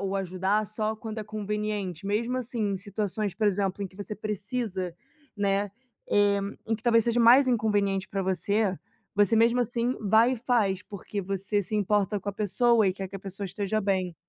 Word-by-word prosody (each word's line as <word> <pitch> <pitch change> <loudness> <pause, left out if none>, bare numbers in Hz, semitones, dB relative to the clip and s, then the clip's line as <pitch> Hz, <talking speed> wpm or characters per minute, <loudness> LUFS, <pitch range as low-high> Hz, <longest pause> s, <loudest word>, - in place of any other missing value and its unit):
ou 195 0 -2
ajudar 190 +3 0
só 215 +1 -2
quando 220 0 -6
é 215 - -4
conveniente, 210 -4 -3
mesmo, 230 +5 0
assim, 230 -4 -2
em - - -1
situações, 205 +1 -3
por 215 -1 +1
exemplo, 200 0 0
em 195 - -3
que 185 - -20
você 205 +1 -5
precisa, 210 -3 -3 0.4
né, 200 0 +1 0.4
eh, 205 -1 +4 0.3
em 225 0 0
que 215 - -19
talvez 230 -2 +4
seja 235 0 +1
mais 250 +4 +7
inconveniente 205 -5 +1
pra 195 -1 -2
você 190 +1 +1 0.4
você 205 +2 +5
mesmo 230 +2 +4
assim 240 +1 0
vai 220 +4 +4
e - - -1
faz, 225 -6 +1
porque 200 0 -6
você 195 +2 -1
se 200 +3 -3
importa 205 0 +1
com 205 - -6
a - - -1
pessoa 220 +2 +3
e 190 - +2
quer 190 0 -6
que 195 - -7
a - - -8
pessoa 195 +1 -6
esteja 200 +3 -2
bem. 190 -3 -1
205 Hz, 195 wpm, -27 LUFS, 195-220 Hz, 0.4 s, mais